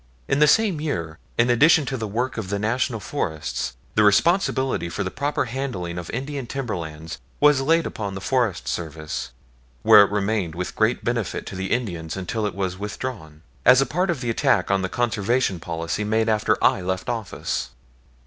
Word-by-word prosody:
In 140 Hz, -, +1 dB
the 150 Hz, -, +6 dB
same 195 Hz, -2 st, +3 dB
year, 85 Hz, -, -3 dB, 0.2 s
in 120 Hz, +1 st, +4 dB
addition 150 Hz, +5 st, +5 dB
to 135 Hz, -, -3 dB
the 115 Hz, -3 st, -3 dB
work 120 Hz, +5 st, -2 dB
of 95 Hz, -4 st, -5 dB
the 100 Hz, -, -1 dB
National 115 Hz, +3 st, 0 dB
Forests, 75 Hz, -, -3 dB, 0.2 s
the 105 Hz, -, +3 dB
responsibility 130 Hz, -, +2 dB
for 85 Hz, +5 st, -3 dB
the 95 Hz, -, -4 dB
proper 145 Hz, +1 st, -1 dB
handling 115 Hz, -9 st, -4 dB
of 85 Hz, -, -8 dB
Indian 135 Hz, +1 st, -4 dB
timberlands 80 Hz, -, -5 dB, 0.2 s
was 145 Hz, -2 st, +5 dB
laid 165 Hz, +4 st, +3 dB
upon 100 Hz, -3 st, -4 dB
the -, -, -4 dB
Forest 115 Hz, -1 st, 0 dB
Service, 75 Hz, -5 st, -4 dB, 0.5 s
where 105 Hz, -, +9 dB
it 100 Hz, -, 0 dB
remained 100 Hz, -4 st, -1 dB
with 90 Hz, +1 st, -4 dB
great 110 Hz, +3 st, +1 dB
benefit 115 Hz, -4 st, -2 dB
to -, -, -7 dB
the 95 Hz, +1 st, -3 dB
Indians 90 Hz, -9 st, -2 dB
until 105 Hz, +3 st, -2 dB
it 95 Hz, -, -6 dB
was 95 Hz, -1 st, -3 dB
withdrawn, 100 Hz, -7 st, -6 dB, 0.2 s
as 125 Hz, +1 st, +7 dB
a 135 Hz, -, +3 dB
part 180 Hz, +9 st, -1 dB
of 160 Hz, -7 st, -1 dB
the 120 Hz, -2 st, -1 dB
attack 110 Hz, -, +2 dB
on 95 Hz, 0 st, +2 dB
the 95 Hz, -, -2 dB
Conservation 115 Hz, -3 st, 0 dB
policy 85 Hz, +4 st, -3 dB
made 110 Hz, +1 st, +1 dB
after 105 Hz, 0 st, +2 dB
I 95 Hz, -, +4 dB
left 95 Hz, 0 st, -3 dB
office. 115 Hz, -5 st, -3 dB
105 Hz, 185 wpm, -23 LUFS, 90-130 Hz, 0.5 s, where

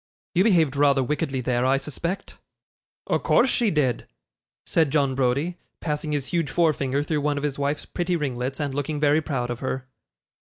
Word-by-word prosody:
'You 180 Hz, +1 st, +4 dB
behaved 165 Hz, -10 st, +3 dB
rather 140 Hz, -1 st, +4 dB
wickedly 140 Hz, -1 st, -1 dB
there, 125 Hz, 0 st, 0 dB
I 130 Hz, +1 st, +3 dB
suspect.' 170 Hz, +8 st, -4 dB, 0.7 s
'O' -, -, +1 dB
course 260 Hz, -, +3 dB
she 235 Hz, -3 st, +2 dB
did,' 140 Hz, -, 0 dB, 0.6 s
said 160 Hz, -3 st, +2 dB
John 140 Hz, -2 st, +2 dB
Browdie, 135 Hz, +7 st, 0 dB, 0.2 s
passing 150 Hz, -1 st, -2 dB
his 145 Hz, -3 st, -1 dB
huge 165 Hz, -4 st, +1 dB
forefinger 140 Hz, -3 st, +1 dB
through 150 Hz, 0 st, -1 dB
one 145 Hz, 0 st, 0 dB
of 145 Hz, -, -3 dB
his 145 Hz, -1 st, -2 dB
wife's 140 Hz, +1 st, -1 dB
pretty 175 Hz, 0 st, -1 dB
ringlets, 135 Hz, -3 st, -2 dB
and 145 Hz, -2 st, -2 dB
looking 145 Hz, +2 st, -2 dB
very 150 Hz, +1 st, +3 dB
proud 125 Hz, -6 st, -2 dB
of 120 Hz, -, -4 dB
her. 130 Hz, -1 st, -3 dB
145 Hz, 180 wpm, -24 LUFS, 135-160 Hz, 0.7 s, You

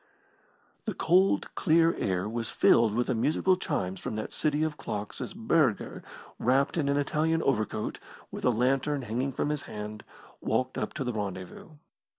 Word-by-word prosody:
The -, -, -3 dB
cold, 185 Hz, +3 st, +3 dB
clear 165 Hz, -1 st, +4 dB
air 95 Hz, 0 st, -1 dB
was 115 Hz, +1 st, -3 dB
filled 115 Hz, -2 st, +4 dB
with 120 Hz, +1 st, +2 dB
the 130 Hz, -, 0 dB
musical 155 Hz, +10 st, +2 dB
chimes 95 Hz, -, -2 dB
from -, -, -4 dB
that 110 Hz, -, -4 dB
city 150 Hz, 0 st, +1 dB
of 155 Hz, -1 st, -1 dB
clocks 105 Hz, -7 st, -5 dB
as 190 Hz, -, -5 dB
Burger, 165 Hz, -, +1 dB, 0.4 s
wrapped 135 Hz, +3 st, +2 dB
in 150 Hz, -4 st, +1 dB
an 140 Hz, -, +2 dB
Italian 155 Hz, +3 st, +1 dB
overcoat, 110 Hz, -4 st, -1 dB, 0.3 s
with -, -, -7 dB
a -, -, +4 dB
lantern 135 Hz, +4 st, +1 dB
hanging 125 Hz, +4 st, -1 dB
from 145 Hz, -, -1 dB
his 150 Hz, -1 st, -1 dB
hand, 105 Hz, 0 st, -6 dB, 0.4 s
walked 130 Hz, +3 st, 0 dB
up -, -, -3 dB
to 140 Hz, -, -2 dB
the 125 Hz, -1 st, -2 dB
rendezvous. 100 Hz, -, -6 dB
130 Hz, 165 wpm, -29 LUFS, 110-155 Hz, 0.4 s, clear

